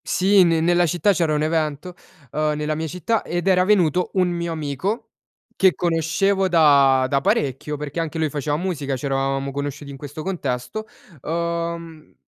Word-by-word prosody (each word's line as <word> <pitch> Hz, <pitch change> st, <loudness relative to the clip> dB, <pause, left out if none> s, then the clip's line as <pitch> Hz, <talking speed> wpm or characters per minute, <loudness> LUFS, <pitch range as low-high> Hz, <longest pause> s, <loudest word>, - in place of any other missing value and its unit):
Sì, 195 Hz, +1 st, +4 dB
ne 165 Hz, -2 st, +2 dB
nella 175 Hz, +1 st, +3 dB
città 175 Hz, +4 st, +2 dB
c'era 165 Hz, -5 st, +1 dB
un 150 Hz, -, 0 dB
evento, 155 Hz, +2 st, -1 dB, 0.4 s
uhm, 155 Hz, 0 st, 0 dB
nella 150 Hz, +1 st, -2 dB
mia 160 Hz, +1 st, -3 dB
città 180 Hz, +7 st, -1 dB
ed 175 Hz, +2 st, -3 dB
era 180 Hz, -1 st, +4 dB
venuto 180 Hz, -3 st, +2 dB
un 185 Hz, -2 st, +2 dB
mio 170 Hz, -1 st, -3 dB
amico 165 Hz, -, -3 dB, 0.5 s
che 190 Hz, -2 st, +4 dB
conoscevo 175 Hz, +4 st, +1 dB
da 140 Hz, -6 st, +5 dB
da 140 Hz, +1 st, +1 dB
parecchio, 140 Hz, +2 st, -1 dB
perché 150 Hz, +2 st, -5 dB
anche 165 Hz, 0 st, -3 dB
lui 160 Hz, -1 st, 0 dB
faceva 145 Hz, +1 st, -2 dB
musica, 150 Hz, -6 st, -2 dB
c'eravamo 135 Hz, +1 st, -1 dB
conosciuti 145 Hz, 0 st, -5 dB
in 135 Hz, -, -9 dB
questo 145 Hz, +2 st, -8 dB
contesto, 170 Hz, -, -4 dB, 0.3 s
uhm, 170 Hz, 0 st, -4 dB
160 Hz, 160 wpm, -22 LUFS, 145-175 Hz, 0.5 s, da